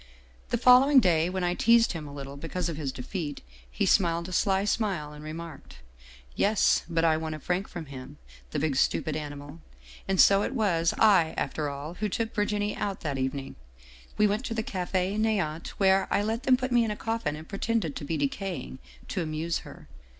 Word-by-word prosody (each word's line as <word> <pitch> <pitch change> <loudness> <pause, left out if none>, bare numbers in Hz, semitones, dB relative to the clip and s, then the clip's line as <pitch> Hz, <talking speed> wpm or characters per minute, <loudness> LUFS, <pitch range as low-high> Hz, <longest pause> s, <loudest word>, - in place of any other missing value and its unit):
" - - -29
The - - +1
following 255 +3 +7
day, 170 -6 +2
when 185 0 -2
I 175 0 +1
teased 230 +4 +4
him 160 -4 -6
a - - -9
little 140 -1 -7
because 165 +5 -3
of 165 - -4
his 145 -3 -3
defeat, 145 +3 -5 0.3
he - - -1
smiled 170 -2 +2
a - - -8
sly 195 +1 +1
smile 190 -9 -1
and 150 0 -11
remarked: 155 - -8 0.3
' 60 0 -22
Yes, 210 +1 +3
but 165 -1 +1
I 160 -1 +4
won 160 -1 -4
a - - -8
franc 180 +6 -2
from 170 -2 -7
him, 135 +1 -10 0.3
the - - -4
big 145 -2 0
stupid 155 - +1
ani^ 145 -1 -5
mal. 145 +3 -11 0.5
And 190 -1 0
so 200 0 +7
it 270 - -2
was 170 -8 +1
I, 190 -7 +4
after 150 -2 -2
all, 140 +3 -6
who 210 +3 -3
took 225 +3 -2
Virginie 205 0 -1
out 195 -2 -3
that 140 -4 -3
evening. 135 +1 -3 0.6
We 210 - +4
went 210 +4 0
to 230 - -3
the 220 - -1
Cafe 185 0 -2
" - - 0
Neant," 190 -8 0
where 195 -1 +3
I 205 - +1
let 225 +4 -2
them 255 -1 +5
put 255 0 -3
me 240 -1 +4
in 225 - -1
the 210 - -2
coffin 225 -10 -2
and 155 +1 -10
pretend 200 -6 -1
to - - -6
be 160 +2 -2
decaying, 145 -2 -3 0.3
to 185 - -2
amuse 160 +1 -2
her. 75 - -13
170 Hz, 215 wpm, -27 LUFS, 150-205 Hz, 0.6 s, following